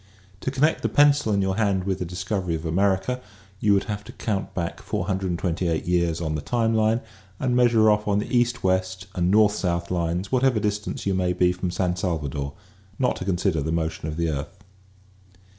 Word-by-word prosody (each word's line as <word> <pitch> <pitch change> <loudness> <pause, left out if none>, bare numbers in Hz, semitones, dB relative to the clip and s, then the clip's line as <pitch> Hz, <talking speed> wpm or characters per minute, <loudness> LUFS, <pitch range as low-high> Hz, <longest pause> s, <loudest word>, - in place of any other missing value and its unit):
To - - -2
connect 140 +4 +1
the - - 0
pencil 145 -5 +4
in 100 -1 +2
your 95 0 -1
hand 100 -4 +1
with 95 -1 -2
the 90 - -2
discovery 90 0 -2
of 80 +1 -6
America 95 +8 +1 0.4
you 105 -1 +4
would 100 - +2
have 105 -1 -4
to 120 - -9
count 100 -4 -3
back 85 -3 -3
428 90 -2 -1
years 85 -2 +1
on 80 -2 -2
the 75 - -2
time 115 +2 0
line 110 +1 +2 0.4
and 125 -2 0
measure 120 -3 +5
off 105 0 0
on 100 -1 +2
the 105 +4 -2
east 120 0 +1
west 95 0 0
and 90 -1 +1
north 105 +1 +5
south 85 -3 -2
lines 90 +2 -1
whatever 130 -3 +3
distance 105 +1 -2
you 100 - +1
may 90 -1 +1
be 90 0 +3
from 90 0 -3
San 90 0 0
Salvador 75 -6 -2 0.2
— 95 +1 -29
not 125 -1 +1
to - - -5
consider 90 -3 0
the 80 +3 -2
motion 80 -1 -2
of 75 0 -4
the 85 -1 0
earth. 75 +6 -5
95 Hz, 200 wpm, -24 LUFS, 85-105 Hz, 0.4 s, measure